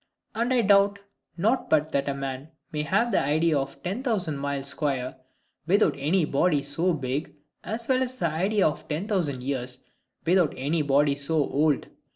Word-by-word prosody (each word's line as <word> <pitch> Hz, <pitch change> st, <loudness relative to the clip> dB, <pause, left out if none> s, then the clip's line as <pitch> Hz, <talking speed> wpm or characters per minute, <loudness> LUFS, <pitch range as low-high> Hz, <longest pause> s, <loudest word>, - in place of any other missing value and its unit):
And 235 Hz, +3 st, -1 dB
I 250 Hz, -2 st, +4 dB
doubt 200 Hz, 0 st, +4 dB, 0.4 s
not 225 Hz, +9 st, +1 dB
but 155 Hz, 0 st, +2 dB
that 140 Hz, 0 st, 0 dB
a 140 Hz, -, -2 dB
man 135 Hz, +1 st, -5 dB, 0.2 s
may 150 Hz, -, -2 dB
have 230 Hz, +11 st, +1 dB
the -, -, +3 dB
idea 155 Hz, +3 st, +2 dB
of 135 Hz, 0 st, -6 dB
ten 195 Hz, +7 st, -3 dB
thousand 195 Hz, -, -1 dB
miles 140 Hz, -1 st, -2 dB
square, 135 Hz, -3 st, -2 dB, 0.5 s
without 185 Hz, -4 st, +4 dB
any 155 Hz, +5 st, +1 dB
body 145 Hz, 0 st, +1 dB
so 165 Hz, +6 st, 0 dB
big, 140 Hz, 0 st, -3 dB, 0.3 s
as 230 Hz, +1 st, -4 dB
well 260 Hz, -1 st, +2 dB
as 255 Hz, 0 st, -1 dB
the 175 Hz, -, 0 dB
idea 190 Hz, +5 st, +2 dB
of 150 Hz, -, -4 dB
ten 160 Hz, +6 st, -3 dB
thousand 155 Hz, -, -1 dB
years, 130 Hz, -2 st, -3 dB, 0.5 s
without 175 Hz, -2 st, +3 dB
any 150 Hz, +5 st, 0 dB
body 145 Hz, 0 st, +3 dB
so 140 Hz, +3 st, -3 dB
old. 150 Hz, 0 st, +2 dB
155 Hz, 180 wpm, -26 LUFS, 140-195 Hz, 0.5 s, I